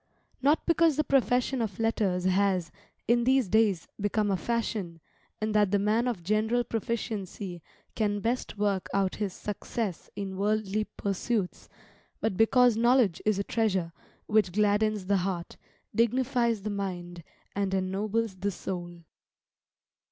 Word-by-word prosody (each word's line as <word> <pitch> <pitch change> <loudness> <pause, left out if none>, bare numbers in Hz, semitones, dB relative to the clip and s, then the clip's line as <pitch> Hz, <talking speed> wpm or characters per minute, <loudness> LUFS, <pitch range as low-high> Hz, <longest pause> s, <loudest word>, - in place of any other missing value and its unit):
Not 290 +4 +3
because 335 -3 +4
the 305 - +2
profession 255 -2 +2
of 210 -5 -3
letters 210 -5 0
has, 185 -3 +2 0.4
in 235 +1 +3
these 260 -2 +3
days, 205 -4 +2
become 205 0 +1
a - - +2
fashion, 200 -4 -2 0.4
and 215 0 -1
that 210 -2 +4
the 205 - +3
man 215 +4 +1
of 220 -9 -2
general 215 +5 +1
proficiency 205 -6 -4 0.3
can 205 -2 0
best 235 +1 -2
work 200 -2 0
out 195 -1 +1
his 205 -3 -2
success 205 -1 -4
in 195 -2 -5
worldly 215 +1 0
pursuits; 200 0 -3 0.5
but 220 -4 -1
because 240 +3 +5
knowledge 235 -6 +3
is 215 -2 +3
a 200 - 0
treasure 195 -7 0 0.3
which 210 -4 +2
gladdens 210 0 +2
the 200 +1 +2
heart, 180 -2 -3 0.4
dignifies 235 -1 +1
the 210 - -2
mind, 175 -4 -5 0.3
and 200 -1 0
ennobles 195 +3 -1
the 200 +2 -1
soul. 175 -3 -6
210 Hz, 135 wpm, -28 LUFS, 190-230 Hz, 0.5 s, because